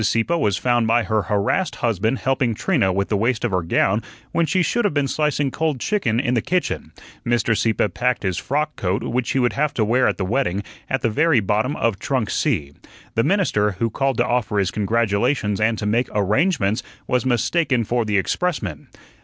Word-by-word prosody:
Sieppe 115 +8 +1
was 105 - +1
found 120 +4 +1
by 115 +1 +3
her 110 -1 0
harassed 105 - 0
husband 115 +2 0
helping 130 -4 0
Trina 125 - +1
with 100 +1 -1
the 105 - +1
waist 115 +3 0
of 120 - -1
her 90 -1 +1
gown 95 +5 +1 0.3
when 170 -1 +1
she 180 +4 +2
should 240 +8 0
have 205 -7 0
been 145 -1 +1
slicing 145 -2 0
cold 155 -3 -1
chicken 120 - 0
in 125 -2 0
the 120 - +2
kitchen. 180 -1 -2 0.3
Mr. 120 -1 +1
Sieppe 110 -1 +1
packed 125 +2 -1
his 95 -3 -1
frock 150 +2 -2
coat, 95 +1 -1
which 125 0 -1
he - - 0
would 125 -2 +2
have 150 +1 -1
to 110 - +1
wear 125 +4 +3
at - - 0
the 95 - -2
wedding, 100 -2 0 0.3
at 135 -2 -1
the 115 - +2
very 160 +4 +3
bottom 110 +7 0
of 115 -8 0
"Trunk 130 -7 -1
C." 80 - -1 0.4
The 115 - +1
minister, 145 - +1
who 115 +4 -2
called 135 +1 0
to 120 - +2
offer 120 -4 0
his 100 -3 +1
congratulations 105 0 0
and 110 +1 +2
to 105 - -4
make 115 +4 +1
arrangements, 105 - +1 0.2
was 125 -2 0
mistaken 130 +1 +1
for 120 +2 0
the 105 -2 0
expressman. 105 - -2
115 Hz, 205 wpm, -21 LUFS, 105-135 Hz, 0.4 s, by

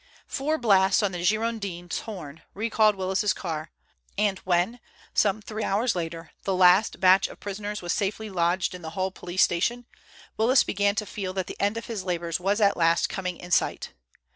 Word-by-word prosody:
Four 305 +3 -1
blasts 195 -5 +4
on 200 - +1
the 175 -1 -5
Girondin's 200 -4 -1
horn 165 -8 -8
recalled 215 0 +2
Willis's 190 +2 0
car, 160 -3 -5 0.5
and 200 -2 +1
when, 185 +7 0 0.3
some 210 0 +2
three 215 +1 -5
hours 215 +3 +1
later, 165 -1 -5
the 195 - 0
last 185 +3 +5
batch 185 +1 +5
of - - -13
prisoners 205 0 -5
was 175 - -1
safely 210 +2 -2
lodged 180 -1 0
in 180 - -8
the 160 - -6
Hull 190 0 0
police 180 0 0
station, 235 +8 0 0.5
Willis 240 +4 +4
began 200 0 +1
to 215 - -1
feel 190 -2 -5
that 190 -1 -2
the - - -8
end 205 +3 +1
of 230 - -5
his 220 -5 -5
labors 170 -2 -2
was 200 +4 0
at 200 -2 +3
last 165 0 +3
coming 180 -2 -4
in 175 - -11
sight. - - 0
195 Hz, 185 wpm, -26 LUFS, 180-215 Hz, 0.5 s, last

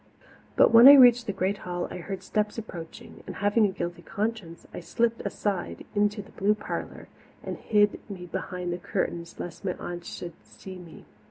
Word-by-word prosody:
But - - +5
when 230 +3 +10
I 285 - +12
reached 245 -3 +7
the - - 0
great 195 +1 -1
hall 175 -1 -4
I - - -6
heard 190 +1 -6
steps 210 +3 -1
approaching 175 -7 -9
and, - - -7
having 205 +2 +2
a - - -3
guilty 175 -1 -5
conscience, 205 -3 -4
I - - -6
slipped 230 +6 -1
aside 200 -4 -3
into 205 0 0
the 215 - -18
blue 205 +2 +1
parlour - - -6 0.4
and - - -5
hid 205 -1 +2
me 185 -3 -7
behind 180 0 -4
the 175 - -5
curtains 170 -1 -4
lest 175 +2 -7
my 185 -2 -2
aunts 175 0 -7
should 175 -1 -7
see 190 -1 -11
me. 170 -2 -13
195 Hz, 185 wpm, -27 LUFS, 175-210 Hz, 0.4 s, I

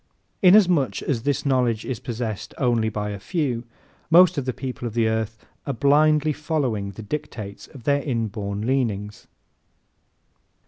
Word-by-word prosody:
Inasmuch 180 -7 +5
as 125 -5 -1
this 140 +3 -1
knowledge 125 -5 +1
is 125 -4 -3
possessed 115 -3 -5
by - - -3
only 115 -3 +2
a 105 -1 -4
few, 125 - -2 0.4
most 180 +2 +7
of 140 -4 -2
the 130 - 0
people 125 -1 -5
of 115 - -7
the 115 -2 +3
earth 110 0 -2 0.2
are 140 - 0
blindly 150 +4 +3
following 135 -10 -2
the 100 +3 -9
dictates 105 -4 -6
of 135 -6 -13
their 140 +3 +2
inborn 110 -6 -3
leanings. 105 -6 -2
125 Hz, 145 wpm, -23 LUFS, 110-145 Hz, 0.4 s, most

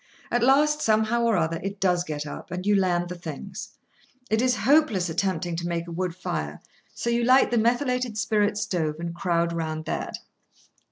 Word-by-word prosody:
At 240 - +2
last, 295 +4 +4
somehow 220 +2 +2
or 230 -3 +3
other, 165 0 0
it 195 +1 -5
does 180 -2 +2
get 150 -3 -4
up, 150 - -8
and 180 +2 -5
you 205 0 +4
land 175 -2 +1
the 180 - -5
things. 175 +3 -8 0.5
It 220 +1 +3
is 250 0 +3
hopeless 220 - +3
attempting 175 -1 -1
to 170 0 -3
make 170 0 -2
a - - -7
wood 175 0 -2
fire, 180 - -4 0.4
so 235 - -1
you 235 0 +1
light 255 +2 +5
the 240 - +3
methylated 245 0 +1
spirit 210 -1 +1
stove, 165 -7 -1
and 170 0 -4
crowd 170 -1 0
round 160 -1 -3
that. - - -3
190 Hz, 185 wpm, -25 LUFS, 170-235 Hz, 0.5 s, light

